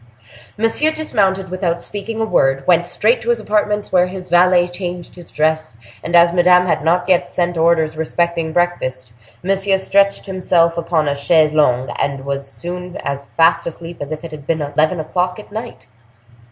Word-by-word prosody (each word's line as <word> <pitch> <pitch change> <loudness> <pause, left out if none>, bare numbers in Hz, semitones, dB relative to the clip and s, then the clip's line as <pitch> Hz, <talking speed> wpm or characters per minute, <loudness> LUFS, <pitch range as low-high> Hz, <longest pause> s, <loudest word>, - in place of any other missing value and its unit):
Monsieur 225 +8 +1
dismounted 195 - -1
without 180 -2 -2
speaking 215 +4 -5
a 225 - +1
word, 135 -9 +1
went 175 -1 +3
straight 220 +6 +1
to 235 - -4
his 240 -1 +2
apartments, 210 -1 -1
where 180 -1 +3
his 185 0 -8
valet 175 0 +4
changed 175 -1 -7
his 175 -2 -13
dress, 155 -4 -1 0.3
and 170 +2 -1
as 170 0 +6
Madame 180 0 +5
had 155 -4 0
not 175 +2 +1
yet 185 -2 +2
sent 175 -1 -2
orders 160 -1 +2
respecting 165 +1 -1
breakfast, 130 -9 -2 0.3
Monsieur 195 +1 +1
stretched 200 +1 +1
himself 175 -3 +1
upon 165 -2 0
a 145 - +1
chaise 155 +2 +2
longue, 130 -4 +2
and 140 -1 -2
was 140 0 -4
soon 180 +2 -7
as 140 0 -4
fast 165 +1 +3
asleep 170 +1 -8
as 145 +1 -6
if 155 +2 -5
it 165 - -8
had 150 -2 -10
been 160 -2 0
eleven 155 +4 0
o'clock 180 +3 -2
at 210 - -12
night. 225 +3 -7
175 Hz, 180 wpm, -18 LUFS, 155-185 Hz, 0.3 s, as